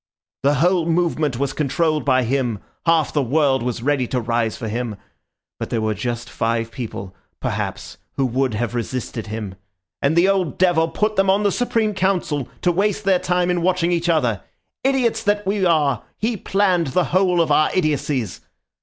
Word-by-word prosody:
"The 140 +2 +3
whole 170 +3 +2
movement 160 -5 +1
was 140 +1 -1
controlled 155 +1 0
by 130 -2 +3
him; 125 -2 0 0.3
half 165 -2 +3
the 150 - +2
world 135 0 +2
was 120 -1 -3
ready 140 -2 +1
to 125 - -1
rise 115 -1 -1
for 115 - -5
him. 115 0 -3 0.6
But - - -4
there 115 - -1
were 110 0 0
just 120 +3 -4
five 115 0 -1
people, 110 -7 -6 0.3
perhaps, - - -4
who 135 - 0
would 130 -1 0
have 120 +1 -2
resisted 120 -1 -4
him... 105 -3 -5 0.5
and 140 +3 +2
the 170 +2 +5
old 190 -6 +1
devil 175 -3 +3
put 210 +6 -1
them 195 0 +3
on 200 +2 +3
the 205 - +3
Supreme 225 -2 0
Council, 180 -8 0
to 180 - +4
waste 205 +3 0
their 190 -2 +3
time 180 0 +1
in 175 -1 0
watching 175 -1 +1
each 170 0 0
other. 120 - +1 0.4
Idiots 255 -4 +1
that 205 -1 0
we 195 0 0
are, 145 -8 +2 0.2
he 225 +2 -1
planned 190 -4 +1
the 175 +7 +1
whole 185 -1 +3
of 165 -3 +2
our 155 +1 +4
idiocies! 145 - -1
155 Hz, 180 wpm, -21 LUFS, 125-185 Hz, 0.6 s, the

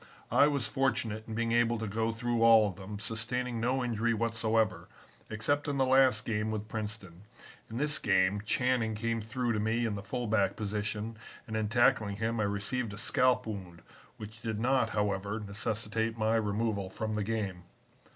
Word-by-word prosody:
I 145 - +6
was 140 -5 0
fortunate 115 -4 0
in 110 - -5
being 115 0 0
able 120 0 +3
to 110 - -3
go 110 +2 -1
through 120 +1 -1
all 115 -2 +7
of 95 - -5
them, 100 +2 -7
sustaining 115 +3 -2
no 125 +3 +1
injury 115 -1 0
whatsoever, 115 -2 0 0.4
except 145 +8 0
in 145 -1 -1
the 135 - +3
last 130 -3 +4
game 105 -1 -1
with 110 -1 -3
Princeton. 105 -5 -6 0.5
In 115 - -6
this 145 +1 +1
game, 95 -3 +2
Channing 125 -3 +1
came 115 +1 -1
through 120 +2 -1
to 105 - 0
me 110 +3 +1
in 110 - -1
the 100 - -4
fullback 105 -4 0
position 105 +1 -3 0.3
and 110 -3 -5
in 110 -1 0
tackling 120 -4 +3
him 115 +2 -1
I 105 - +2
received 105 +3 -2
a - - -11
scalp 125 +3 +2
wound 95 -6 -7 0.3
which 110 +1 -10
did 110 -2 -3
not, 125 -1 +2
however, 100 0 -1
necessitate 110 +2 -2
my 110 +1 +2
removal 105 -2 0
from 110 +3 -4
the 105 -1 -1
game. 100 -4 -2
110 Hz, 180 wpm, -31 LUFS, 105-120 Hz, 0.5 s, all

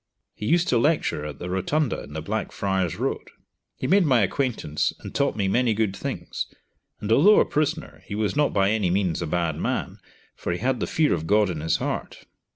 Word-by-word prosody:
He 105 - -5
used 170 +5 +3
to 120 - +3
lecture 145 - +1
at 75 -2 -6
the 90 - -6
rotunda 115 - 0
in 75 - -11
the 80 0 -4
Blackfriar's 95 -3 -1
Road. - - -3 0.5
He - - -4
made 195 +2 +4
my 130 -7 +4
acquaintance, 105 - 0
and - - -8
taught 140 - +1
me 100 -3 0
many 120 +2 +2
good 105 -3 0
things, - - -4 0.5
and 105 - -3
although 185 - +7
a - - +4
prisoner, 155 +2 -2
he 100 - -4
was 105 +3 -1
not 145 0 +2
by 100 0 +2
any 105 -5 +1
means 90 -3 0
a 85 - -2
bad 85 -1 -1
man, - - -2 0.4
for 85 - -3
he - - -2
had 125 +4 0
the - - -1
fear 155 -2 +2
of 80 -2 -3
God 105 -1 +3
in 80 -3 -5
his 80 - +1
heart. - - -4
105 Hz, 210 wpm, -25 LUFS, 90-135 Hz, 0.5 s, although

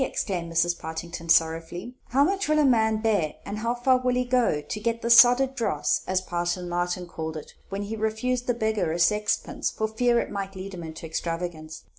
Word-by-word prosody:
exclaimed 175 -9 -3
Mrs. 170 +1 +1
Partington 165 +1 -6
sorrowfully, 165 +7 +1 0.2
"how 275 +3 +4
much 390 +2 0
a 305 -1 +4
man 220 -4 +3
will 215 - -4
bear, 200 -9 +1
and 210 - -5
how 235 +2 -1
far 255 +1 +3
he 255 - -3
will 250 0 0
go, 245 -11 +2
to 150 +8 -6
get 230 +1 -2
the 235 - +1
soddered 245 +3 +7
dross, 185 - 0
as 185 0 +1
Parson 175 0 -2
Martin 175 +1 -2
called 160 -2 -5
it 150 - -10 0.2
when 200 +1 -3
he 210 +2 -4
refused 225 +3 -1
the 245 - +1
beggar 220 -7 0
a 165 - -2
sixpence 210 +5 +1
for 220 - -2
fear 235 +2 +2
it - - -3
might 195 -1 -5
lead 190 +1 -7
him 180 - -7
into 160 0 -8
extravagance! 165 -1 -5
200 Hz, 205 wpm, -26 LUFS, 170-235 Hz, 0.2 s, soddered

